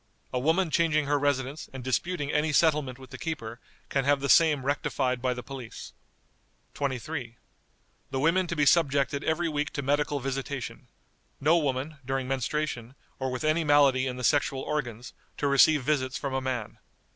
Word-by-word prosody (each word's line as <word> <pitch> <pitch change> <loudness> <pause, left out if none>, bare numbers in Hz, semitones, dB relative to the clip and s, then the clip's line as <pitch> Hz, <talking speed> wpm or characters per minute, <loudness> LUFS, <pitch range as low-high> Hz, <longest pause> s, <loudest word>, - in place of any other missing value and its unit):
A 125 - +1
woman 160 +5 +2
changing 160 -3 +2
her 145 +1 +1
residence, 140 +1 -1
and 130 -1 -8
disputing 145 +3 -1
any 155 +1 +1
settlement 150 -5 +2
with 130 -1 -14
the 130 - -8
keeper, 120 -9 -5 0.3
can 135 - +1
have 140 +1 +3
the 140 0 -3
same 150 -5 +5
rectified 130 -3 0
by 125 -1 0
the 125 - -6
police." 130 -5 -9 0.8
"23. 130 -2 -4 0.7
The 135 - -2
women 170 +5 +2
to 170 - -3
be 150 -2 +2
subjected 140 -3 +3
every 165 +2 0
week 150 -2 -1
to 140 - -3
medical 145 +1 +1
visitation. 135 0 -5 0.5
No 155 +4 +4
woman, 145 +1 -2
during 130 0 -2
menstruation, 135 -2 -2 0.2
or 130 0 -1
with 125 +2 -4
any 155 +2 +2
malady 140 -3 +4
in 125 -1 -4
the 125 - -6
sexual 135 0 +2
organs, 120 -6 -4 0.2
to 145 - 0
receive 140 +1 +5
visits 130 -2 0
from 140 -2 -4
a 135 - 0
man. 125 -4 -4
140 Hz, 170 wpm, -28 LUFS, 130-150 Hz, 0.8 s, same